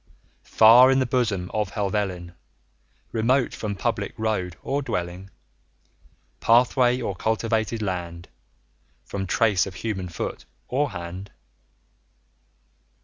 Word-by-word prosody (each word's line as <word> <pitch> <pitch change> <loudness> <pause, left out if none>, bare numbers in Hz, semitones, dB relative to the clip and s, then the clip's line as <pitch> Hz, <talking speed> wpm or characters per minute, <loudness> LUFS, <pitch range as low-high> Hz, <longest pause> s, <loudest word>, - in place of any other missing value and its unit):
[B] - - -42 0.4
20 - - -22
Far 120 +4 +8
in 135 - +4
the 130 - +2
bosom 110 -7 -1
of 105 -2 -1
Helvellyn, 95 -4 -2 0.8
Remote 120 +3 +1
from 105 -2 -4
public 105 0 -2
road 105 -6 -2
or 140 +1 -1
dwelling, 95 -6 -4 1.1
Pathway, 125 +1 +3
or 100 -6 -3
cultivated 110 +1 -1
land; 85 -3 -4 0.8
From 95 -1 -4
trace 100 -4 +2
of 95 - -9
human 95 -2 -4
foot 85 - -5 0.2
or 140 +3 0
hand. 90 +1 -7
105 Hz, 115 wpm, -24 LUFS, 95-120 Hz, 1.1 s, Far